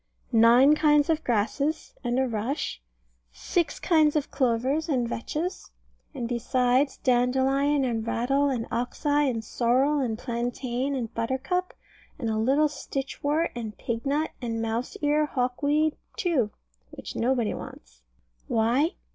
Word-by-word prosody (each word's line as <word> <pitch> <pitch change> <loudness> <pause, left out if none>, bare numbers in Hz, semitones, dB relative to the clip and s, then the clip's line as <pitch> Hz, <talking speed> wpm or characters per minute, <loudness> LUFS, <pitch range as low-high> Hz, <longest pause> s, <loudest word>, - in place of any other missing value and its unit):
Nine 235 +5 +7
kinds 300 0 +4
of 315 0 -1
grasses, 255 +8 -1
and 240 0 0
a 265 0 +2
rush. 230 - -3 0.5
Six 295 - -1
kinds 310 -3 +3
of 300 -1 -1
clovers 265 +5 0
and 250 -5 +1
vetches; 310 +10 -4 0.5
and 245 -3 -3
besides, 250 +3 +1
dandelion, 265 +3 +2
and 230 -2 -2
rattle, 275 +5 +1
and 240 -4 -2
oxeye, 290 +5 0
and 225 -3 -3
sorrel, 260 +7 +2
and 235 -5 -1
plantain, 245 +3 -2
and 235 -3 -4
buttercup, 265 +10 -2 0.4
and 235 -7 -2
a 220 - -1
little 275 +7 +3
stitchwort, 285 +2 -2
and 220 -4 -6
pignut, 275 +7 -1
and 230 -2 -3
mouse 225 +2 -3
ear 300 +1 +2
hawkweed, 285 +4 0 0.2
too, 295 - +1 0.4
which - - -9
nobody 240 -2 +1
wants. - - -10 0.5
Why? 240 - +2
260 Hz, 130 wpm, -26 LUFS, 235-290 Hz, 0.5 s, Nine